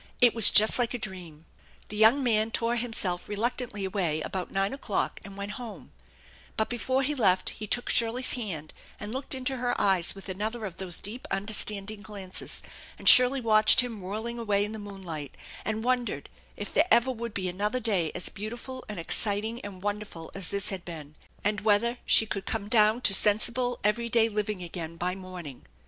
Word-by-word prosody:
It 245 -2 +6
was 230 -2 +7
just 215 +4 +6
like 245 0 +1
a - - -1
dream. 175 -8 -6 0.4
The 210 - -7
young 220 +6 +5
man 220 -3 +2
tore 230 +1 0
himself 225 -7 -1
reluctantly 210 -1 -2
away 185 -5 -1
about 185 +3 -4
nine 195 +3 0
o'clock 245 -7 -2
and 200 0 -11
went 200 +1 -5
home, 230 -3 -9 0.7
but 220 - 0
before 260 +3 0
he 290 +3 0
left 190 -9 +2
he 215 - -8
took 245 +4 +1
Shirley's 235 +2 +2
'hand 175 -11 -5 0.3
and 210 +2 -6
looked 265 +1 -3
into 260 0 -1
her 245 0 -1
eyes 190 -3 +3
with 195 - -10
another 215 +4 -3
of 185 -4 -7
those 180 -3 -3
deep 225 +6 -6
inderstanding 205 +1 -2
glances, 200 -3 -6 0.3
and - - -6
Shirley 255 +1 +7
watched 215 +2 +6
him 235 -5 -6
whirling 220 +5 -4
away 205 -3 +1
in 210 - -6
the 220 - -6
moonlight, 190 -8 -8 0.3
and 220 +1 -3
wondered 250 -1 -1 0.3
if - - -6
there 320 - +3
ever 255 -3 +4
would 235 -2 -6
be 185 -2 -1
another 205 +7 -1
day 195 -9 +1
as - - -1
beautiful 240 +5 -7
and 210 -4 -5
exciting 215 +6 +1
and 195 -2 -9
wonderful 205 -5 -5
as 195 -3 -3
this 200 -1 0
had 190 -3 -5
been, 155 -4 -9 0.3
and 210 0 0
whether 220 +3 +2
she 220 - +6
could 195 -3 -5
come 205 - -3
down 220 +1 +4
to 200 - +3
sensible, 235 +5 +2
every 225 +3 +1
day 230 -1 +4
living 210 -3 -3
again 165 -1 -6
by 180 +2 -1
morning. 180 -7 -9
210 Hz, 190 wpm, -28 LUFS, 190-235 Hz, 0.7 s, was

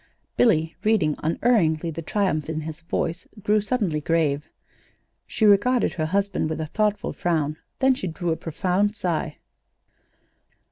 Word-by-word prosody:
Billy, 165 -9 +3
reading 200 -9 +2
unerringly 165 -3 +1
the 165 +1 -5
triumph 160 -4 -1
in 155 -1 -2
his 155 +1 -7
voice, 165 +1 -3 0.2
grew 210 0 +3
suddenly 200 -9 -1
grave. 150 -2 0 0.8
She 220 - 0
regarded 215 +5 +4
her 155 -2 -1
husband 200 -2 0
with 160 - -3
a 160 - -2
thoughtful 210 +5 -1
frown; 155 -3 -1 0.2
then 265 0 +4
she 220 -7 -4
drew 170 +1 -2
a - - +1
profound 185 +6 0
sigh. 165 -5 -2
170 Hz, 140 wpm, -24 LUFS, 155-205 Hz, 0.8 s, regarded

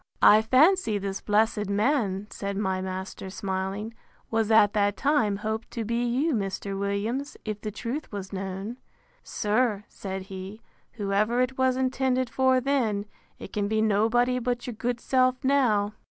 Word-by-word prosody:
I 215 +1 +8
fancy 260 - +4
this 195 -1 -4
blessed 210 -1 +1
man, 205 -2 +1
said 200 -1 -4
my 190 -2 -1
master 190 0 -5
smiling, 195 +3 -3 0.4
was, 225 -1 +1
at 220 -2 +5
that 205 -1 +1
time, 280 -8 +2
hoped 220 +2 -4
to 225 - -1
be 235 +2 0
you, 260 +7 +1
Mr. 195 -2 -2
Williams, 215 +8 -2
if 210 -1 -4
the 215 - -3
truth 235 +8 -5
was 200 -2 -6
known. 195 +4 -5 0.5
Sir, 210 -1 0
said 190 -1 -6
he, 190 +2 -8 0.3
whoever 210 +2 0
it 255 +1 +1
was 260 -1 +2
intended 260 -1 0
for 260 +1 +3
then, 240 -7 0 0.3
it - - -10
can 205 -1 0
be 220 +1 0
nobody 225 +4 +2
but 245 0 -2
your 245 - -4
good 240 +2 -2
self 255 +1 +2
now. 230 -7 +2
220 Hz, 155 wpm, -26 LUFS, 200-250 Hz, 0.5 s, I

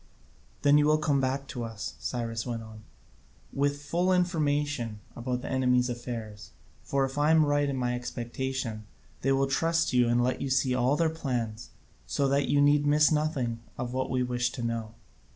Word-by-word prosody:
"Then 145 +1 +6
you 150 - +3
will 155 0 +4
come 145 -3 +1
back 135 +1 -1
to 120 - -4
us," 115 -1 -5
Cyrus 115 -2 -3
went 115 -2 -4
on, 110 -1 -11 0.7
"with 145 +1 0
full 175 +5 +1
information 150 - 0 0.2
about 125 +1 -3
the - - -5
enemy's 125 -1 +2
affairs; 115 -4 -6 0.3
for, 140 -1 0
if 135 +2 -4
I 150 +1 +3
am 160 -1 +5
right 145 0 +2
in 140 - -2
my 125 -1 0
expectation, 120 -2 -4 0.3
they 135 - +1
will 135 0 +3
trust 165 +4 +1
you 125 -1 +4
and 120 +1 +3
let 125 +1 0
you 140 - -2
see 130 -1 +2
all 125 +2 +2
their 160 +1 +1
plans, 120 -8 -3 0.4
so 140 - +1
that 140 0 +2
you 145 0 +4
need 145 0 +4
miss 150 +1 +5
nothing 145 -7 0 0.2
of 125 0 -4
what 130 0 -1
we 130 -1 +1
wish 125 0 0
to 120 - -5
know." 115 -1 -3
130 Hz, 190 wpm, -28 LUFS, 120-145 Hz, 0.7 s, Then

